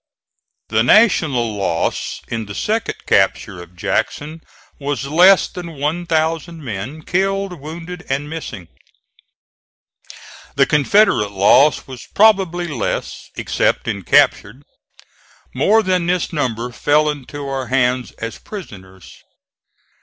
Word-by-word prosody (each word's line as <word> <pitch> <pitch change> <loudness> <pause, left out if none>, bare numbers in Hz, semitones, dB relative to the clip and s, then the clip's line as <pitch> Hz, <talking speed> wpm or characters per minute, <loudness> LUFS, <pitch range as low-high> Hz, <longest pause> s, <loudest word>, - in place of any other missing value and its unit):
The 110 0 +2
National 135 - +3
loss 90 -4 -2
in 115 -2 -4
the 100 - -8
second 225 +2 -1
capture 95 -1 +1
of 85 +1 -14
Jackson 150 - -3 0.4
was 140 -1 -3
less 180 +6 +5
than 175 -2 -8
one 155 +5 -2
thousand 160 0 -1
men, 125 +8 -6
killed, 195 0 -1
wounded 170 +4 -8
and 140 +2 -2
missing. 135 - -7 1.9
The - - +4
Confederate 150 - +3
loss 125 +10 +4
was 130 -2 -10
probably 190 -5 +3
less, 140 -9 -4
except - - -1
in 100 - -2
captured. 110 +9 +2 0.9
More 210 +12 +3
than 185 -3 0
this 180 0 -1
number 125 -5 -2
fell 150 +5 +2
into 145 -1 -5
our 135 -2 -3
hands 125 -1 0
as 115 0 -7
prisoners. 95 - -11
145 Hz, 115 wpm, -18 LUFS, 115-175 Hz, 1.9 s, less